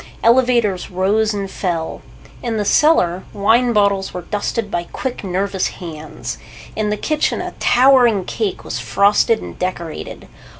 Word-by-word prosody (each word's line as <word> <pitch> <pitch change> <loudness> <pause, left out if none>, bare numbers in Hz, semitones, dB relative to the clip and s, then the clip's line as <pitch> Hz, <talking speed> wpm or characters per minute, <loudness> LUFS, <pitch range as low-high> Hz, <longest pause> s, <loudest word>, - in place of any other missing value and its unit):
Elevators 235 -5 +3
rose 205 +4 +1
and 200 -2 -4
fell. 170 -4 -3 0.4
In 230 -2 -2
the 210 - -1
cellar, 190 - +3
wine 230 +5 +3
bottles 200 -3 +1
were 180 - -5
dusted 210 +2 -3
by 175 -2 -2
quick, 255 -3 -4
nervous 190 0 -1
hands. 160 -3 -7 0.4
In 215 -1 -1
the 210 - -1
kitchen, 305 +7 0
a - - -5
towering 245 -6 +4
cake 400 -4 -3
was - - -4
frosted 205 +3 +2
and - - -9
decorated. 175 -3 -5
205 Hz, 140 wpm, -18 LUFS, 185-235 Hz, 0.4 s, towering